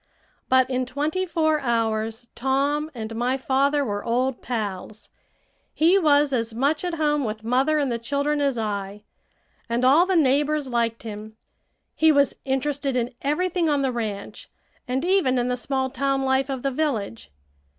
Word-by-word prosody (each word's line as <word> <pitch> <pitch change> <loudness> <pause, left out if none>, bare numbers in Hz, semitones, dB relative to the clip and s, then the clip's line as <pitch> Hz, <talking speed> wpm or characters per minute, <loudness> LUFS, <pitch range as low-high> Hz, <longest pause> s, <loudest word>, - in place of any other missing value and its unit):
But 260 0 +4
in 255 -1 -2
twenty 305 +8 -2
four 315 -2 +1
hours 225 -2 -1
Tom 280 +4 0
and 225 -1 -6
my 245 +3 0
father 275 +2 +1
were 205 -3 -3
old 245 +2 -1
pals. 215 -3 -5 0.6
He 345 +5 +4
was 290 -4 +3
as 230 -2 -1
much 280 +7 +1
at 355 -2 -2
home 295 -2 +1
with 215 -1 -4
mother 260 +7 +2
and 280 -4 0
the 235 - -2
children 285 +4 -1
as 275 -3 +1
I, 205 -2 -4 0.7
and 235 +2 +1
all 305 +8 +5
the 380 - +1
neighbors 295 -1 +2
liked 235 -2 -1
him. 215 0 -8 0.6
He 320 0 +4
was 280 -2 +2
interested 275 0 -1
in 245 0 -1
everything 340 +3 0
on 285 -2 +1
the 265 - +1
ranch, 215 -4 -5 0.4
and 260 +5 -1
even 355 -9 +2
in 245 0 0
the 250 - 0
small 260 +1 -2
town 275 +1 0
life 265 0 +1
of 265 -2 -4
the 275 - 0
village. 240 - -3
265 Hz, 165 wpm, -24 LUFS, 235-295 Hz, 0.7 s, all